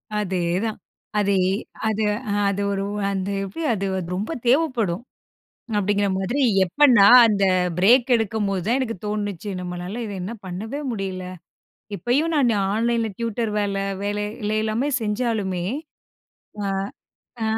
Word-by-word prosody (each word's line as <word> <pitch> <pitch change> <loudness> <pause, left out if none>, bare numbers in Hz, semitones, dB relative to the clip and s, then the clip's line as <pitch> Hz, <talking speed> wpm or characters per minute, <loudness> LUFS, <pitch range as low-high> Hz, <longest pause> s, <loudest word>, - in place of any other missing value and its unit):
அதேதான். 185 +1 -1 0.4
அதே, 200 -1 +2 0.5
அது 220 0 0 0.3
அ - - +1 0.2
அது 200 0 -1
ஒரு 195 0 -1 0.2
அ - - +1
அந்த 190 0 -2
எப்பிடி 195 - -5
அது 200 -2 -2 0.3
ரொம்ப 205 - -3 0.2
தேவைப்படும், 240 - +2 0.7
அப்பிடிங்கிற 205 0 +1
மாதிரி 210 +9 -1 0.2
எப்ப 285 +12 +4
நான் 200 +6 +9
அந்த 205 -3 +2 0.3
பிரேக் 245 +7 +5
எடுக்கும்போது 205 -4 -1
தான் 240 +4 +2
எனக்கு 230 -4 -2
தோணுனுச்சு. 205 -2 -3
நம்மளால 180 +5 -5
இத 205 - -6
என்ன 200 +6 -4
பண்ணவே 215 +10 -5
முடியல. 190 -3 -4 0.7
இப்பயும் 280 +10 +1
நான் 265 -5 +3 0.2
ஆன்லைன் 230 +1 +1
ல - - -2
டியூட்டர் 230 -1 -1
வேல 200 -1 -1 0.3
வேலையெல்லாமே 215 +3 -1
செஞ்சாலுமே, 210 -5 -1 1.0
ஆ, - - -2 0.8
அ - - +1
210 Hz, 125 wpm, -23 LUFS, 195-235 Hz, 1.0 s, நான்